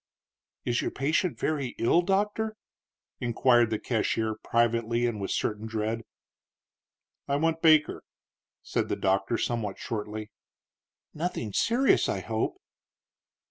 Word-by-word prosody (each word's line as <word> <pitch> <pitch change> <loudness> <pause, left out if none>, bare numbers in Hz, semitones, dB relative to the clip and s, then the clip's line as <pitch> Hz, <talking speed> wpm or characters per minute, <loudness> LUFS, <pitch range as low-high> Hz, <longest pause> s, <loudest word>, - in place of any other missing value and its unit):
"Is 120 -1 +1
your - - -1
patient 160 +6 0
very 140 -5 -2
ill, 165 +9 +4
doctor?" 210 +4 0 0.6
inquired 120 0 +3
the 110 - 0
cashier, 110 -1 0
privately 115 +1 +1
and 115 -4 -2
with 95 - -3
a - - 0
certain 105 +1 -2
dread. 110 +1 -2 1.3
"I 140 - +1
want 165 +2 +1
Baker," 155 -2 +4 0.6
said - - -1
the - - 0
doctor, 95 +4 +1
somewhat 110 -5 -2
shortly. 105 -1 -5 0.8
"Nothing 150 - -3
serious, 245 - +3
I - - -1
hope." 365 - -2
120 Hz, 120 wpm, -28 LUFS, 110-160 Hz, 1.3 s, ill